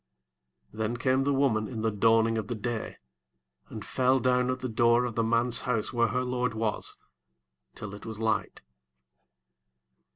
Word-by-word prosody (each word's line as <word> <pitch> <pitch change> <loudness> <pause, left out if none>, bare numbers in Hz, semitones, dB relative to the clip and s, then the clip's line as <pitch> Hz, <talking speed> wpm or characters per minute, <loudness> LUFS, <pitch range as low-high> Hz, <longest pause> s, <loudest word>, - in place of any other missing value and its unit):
26 110 - -13
Then 110 +2 -1
came 130 +2 +1
the 140 - +2
woman 115 -6 +1
in 115 -3 -5
the 110 0 +1
dawning 115 +2 +3
of 105 - -5
the 120 - -3
day, 110 +1 -4 0.7
and - - -8
fell 130 +1 +2
down 125 0 +2
at 130 0 -2
the 130 - -2
door 120 +1 +3
of 120 - -3
the 115 - 0
man's 115 +1 +2
house 125 -2 -1
where 115 -1 +3
her 125 +4 -1
lord 125 -1 -1
was, 110 -1 -2 0.8
till 100 -2 -7
it 105 - -10
was 110 -1 -6
light. 110 - -1
115 Hz, 170 wpm, -28 LUFS, 110-125 Hz, 0.8 s, dawning